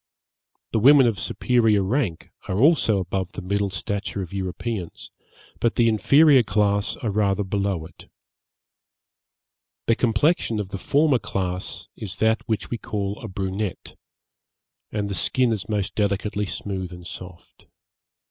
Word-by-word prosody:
The 110 Hz, -, +1 dB
women 135 Hz, +3 st, +7 dB
of 115 Hz, -4 st, +1 dB
superior 115 Hz, -5 st, +2 dB
rank 100 Hz, -, -1 dB, 0.2 s
are 95 Hz, -, -1 dB
also 135 Hz, -5 st, +4 dB
above 95 Hz, 0 st, -3 dB
the -, -, -6 dB
middle 100 Hz, +2 st, 0 dB
stature 100 Hz, 0 st, -3 dB
of 90 Hz, -, -10 dB
Europeans, 95 Hz, 0 st, -5 dB, 0.5 s
but 115 Hz, -, +1 dB
the 120 Hz, -, +4 dB
inferior 140 Hz, +5 st, +5 dB
class 100 Hz, -1 st, +1 dB
are 115 Hz, -6 st, -3 dB
rather 100 Hz, 0 st, +1 dB
below 100 Hz, -4 st, -1 dB
it. -, -, -15 dB, 1.8 s
The 115 Hz, -, +4 dB
complexion 115 Hz, +1 st, +1 dB
of 100 Hz, -3 st, -4 dB
the 100 Hz, -, -5 dB
former 145 Hz, 0 st, +3 dB
class 90 Hz, -3 st, -4 dB
is 100 Hz, -4 st, -7 dB
that 110 Hz, 0 st, +2 dB
which 110 Hz, -, -2 dB
we 120 Hz, -, -2 dB
call 105 Hz, -2 st, -3 dB
a 115 Hz, -, -7 dB
brunette, 95 Hz, 0 st, -4 dB, 1.0 s
and 105 Hz, -1 st, -2 dB
the 100 Hz, -, -3 dB
skin 125 Hz, +6 st, +2 dB
is 110 Hz, -2 st, -3 dB
most 105 Hz, -2 st, -1 dB
delicately 105 Hz, 0 st, -1 dB
smooth 95 Hz, -3 st, -4 dB
and 90 Hz, -1 st, -10 dB
soft. 90 Hz, -1 st, -11 dB
105 Hz, 140 wpm, -24 LUFS, 95-115 Hz, 1.8 s, women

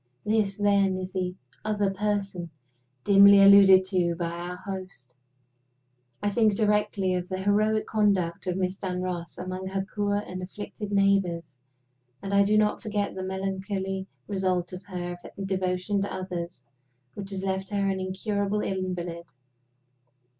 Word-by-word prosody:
This, 210 Hz, -2 st, +1 dB
then, 200 Hz, -2 st, +3 dB
is 185 Hz, 0 st, -5 dB
the 180 Hz, -1 st, -2 dB, 0.3 s
"other 210 Hz, -2 st, 0 dB
person" 195 Hz, -3 st, -2 dB, 0.5 s
dimly 200 Hz, +2 st, +8 dB
alluded 195 Hz, -1 st, +8 dB
to 175 Hz, -3 st, +1 dB
by 170 Hz, 0 st, -3 dB
our 175 Hz, +1 st, -5 dB
host! 185 Hz, -10 st, -8 dB, 1.1 s
I 205 Hz, -, +1 dB
think 215 Hz, -1 st, +3 dB
directly 210 Hz, -3 st, +1 dB
of 180 Hz, 0 st, -3 dB
the 185 Hz, -, -2 dB
heroic 215 Hz, +2 st, +2 dB
conduct 195 Hz, -5 st, +1 dB
of 180 Hz, 0 st, -1 dB
Miss 185 Hz, 0 st, -2 dB
Dunross 180 Hz, -3 st, -4 dB
among 185 Hz, +1 st, -5 dB
her 190 Hz, 0 st, -2 dB
poor 205 Hz, -1 st, +1 dB
and 185 Hz, -3 st, -4 dB
afflicted 205 Hz, +2 st, -7 dB
neighbors; 195 Hz, -6 st, +1 dB, 0.6 s
and 195 Hz, +6 st, -5 dB
I 200 Hz, -, +5 dB
do 210 Hz, +2 st, +3 dB
not 210 Hz, 0 st, +2 dB
forget 205 Hz, -2 st, -2 dB
the 190 Hz, -, -5 dB
melancholy 190 Hz, 0 st, -3 dB, 0.2 s
result 185 Hz, -3 st, -1 dB
of 180 Hz, -, -6 dB
her 175 Hz, -2 st, -5 dB, 0.3 s
devotion 190 Hz, +1 st, -1 dB
to 200 Hz, -, -3 dB
others 175 Hz, -6 st, -5 dB, 0.5 s
which 195 Hz, -1 st, -7 dB
has 195 Hz, -1 st, -4 dB
left 190 Hz, 0 st, -2 dB
her 200 Hz, -1 st, 0 dB
an 190 Hz, -1 st, 0 dB
incurable 200 Hz, +2 st, -1 dB
invalid. 180 Hz, -3 st, -3 dB
190 Hz, 140 wpm, -27 LUFS, 185-200 Hz, 1.1 s, dimly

